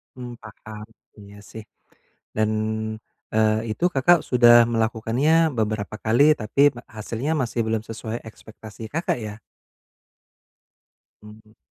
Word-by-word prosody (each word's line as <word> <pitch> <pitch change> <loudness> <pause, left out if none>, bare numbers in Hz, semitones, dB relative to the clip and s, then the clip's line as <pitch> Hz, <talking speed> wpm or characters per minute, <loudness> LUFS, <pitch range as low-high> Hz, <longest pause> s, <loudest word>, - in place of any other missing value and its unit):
Hmm 125 -1 -8
paham, 110 0 -11 0.3
iya 100 0 -14
sih, 110 -1 -9 0.7
dan, 110 0 +1 0.8
eee, 110 +1 +1
itu 170 - -4
Kakak 165 +6 +4
sudah 120 -1 +6
melakukannya 120 +8 +1
beberapa 110 -1 -2
kali 140 +8 +4
tapi 110 +6 -2
ma 120 - -10
hasilnya 115 +8 -3
masih 120 -1 -3
belum 110 -1 -1
sesuai 115 +1 -6
ekspektasi 110 0 -12
Kakak 165 -5 -2
ya? 105 -1 -6 1.9
Hmm. 110 +1 -16
110 Hz, 115 wpm, -23 LUFS, 110-125 Hz, 1.9 s, sudah